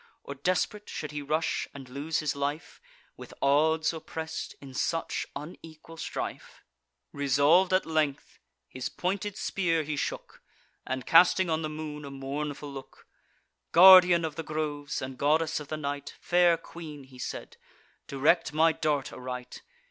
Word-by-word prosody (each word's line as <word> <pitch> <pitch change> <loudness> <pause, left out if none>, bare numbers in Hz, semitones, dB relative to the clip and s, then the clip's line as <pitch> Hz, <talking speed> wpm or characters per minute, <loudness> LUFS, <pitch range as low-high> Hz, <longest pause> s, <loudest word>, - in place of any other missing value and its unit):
Or 140 - -6
desperate 185 +8 -1
should 150 - -5
he 150 0 -4
rush 155 +3 -1
and 135 -2 -9
lose 145 +6 -2
his 150 -2 -1
life, 145 +2 -4 0.4
With - - -11
odds 160 +4 +3
oppress'd, 160 0 -6
in 135 -2 -11
such 165 +5 -2
unequal 160 +2 -10
strife? - - -6 0.5
Resolv'd 145 +7 +3
at 185 0 +3
length, 155 -3 -1 0.3
his 130 - -5
pointed 195 +2 -3
spear 165 -4 0
he 150 0 -3
shook; 140 - -5 0.5
And, 130 -1 -3
casting 175 +1 +5
on 160 0 0
the 155 - -3
moon 150 -1 -6
a 140 - -7
mournful 140 +1 -5
look: 135 -1 -11 0.7
"Guardian 180 -1 +9
of 160 +1 -4
groves, 150 -2 -3
and 130 0 -7
goddess 155 +2 +2
of 150 - -9
the 155 - -4
night, 145 -1 -5
Fair 175 -1 +4
queen," 160 -3 -10
he 130 -1 -16
said, - - -6 0.5
"direct 150 +4 +2
my 160 +2 +4
dart 150 -3 -1
aright. 125 -1 -7
155 Hz, 145 wpm, -28 LUFS, 140-165 Hz, 0.7 s, Guardian